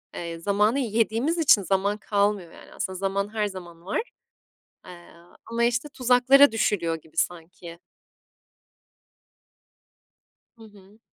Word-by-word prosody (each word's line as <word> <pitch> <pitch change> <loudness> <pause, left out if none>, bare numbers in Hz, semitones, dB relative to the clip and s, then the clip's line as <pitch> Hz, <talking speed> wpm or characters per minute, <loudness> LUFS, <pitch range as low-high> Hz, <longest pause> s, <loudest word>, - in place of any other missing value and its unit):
eee, 170 -1 -6
zamanı 210 +8 +1
yediğimiz 230 +6 0
için 275 -10 +5
zaman 195 +3 0
kalmıyor 200 -4 -1
yani. - - -15
Aslında 190 -3 -4
zaman 200 +2 -2
her 210 -1 0
zaman 175 -3 -11
var, 205 - -1 0.9
eee, 175 -1 -13 0.4
ama, 230 +1 -1
işte, 245 +5 0
tuzaklara 255 0 +4
düşülüyor 175 -7 0
gibi 160 0 -20
sanki. 170 0 -4 2.8
Hı 225 - -15
hı. 205 0 -18
205 Hz, 115 wpm, -25 LUFS, 180-230 Hz, 2.8 s, için